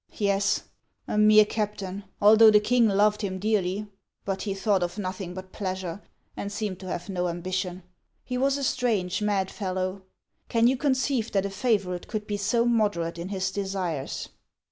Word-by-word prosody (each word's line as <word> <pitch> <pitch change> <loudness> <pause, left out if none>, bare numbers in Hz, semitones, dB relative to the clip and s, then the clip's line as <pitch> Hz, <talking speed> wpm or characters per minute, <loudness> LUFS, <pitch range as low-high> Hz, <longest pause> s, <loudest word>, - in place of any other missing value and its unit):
"Yes, 200 -1 +1 0.4
a - - -2
mere 215 0 +7
captain, 205 -2 -4
although 220 +2 +8
the 210 -1 +6
king 235 +2 +3
loved 210 +1 +3
him 190 -2 -2
dearly. 205 -1 0 0.4
But 195 -1 -2
he 200 -2 -2
thought 195 -1 +1
of 175 +3 -2
nothing 185 -2 -4
but 185 0 -8
pleasure, 185 -2 -4 0.3
and 200 - -5
seemed 205 -3 -3
to 190 - -9
have 175 -1 -4
no 180 -2 -1
ambition. 185 +1 -3 0.4
He 250 - -4
was 270 +2 +2
a 280 - -4
strange, 215 -8 0
mad 200 -2 0
fellow. 185 0 -3 0.5
Can 230 0 +3
you 255 +2 +4
conceive 260 -3 0
that 195 -1 +2
a 200 - -3
favorite 195 -4 0
could 215 -1 -4
be 205 -1 -2
so 230 +4 +1
moderate 205 -8 +1
in 175 +2 -5
his 190 -1 -1
desires?" 190 -8 -3
200 Hz, 170 wpm, -26 LUFS, 185-215 Hz, 0.5 s, although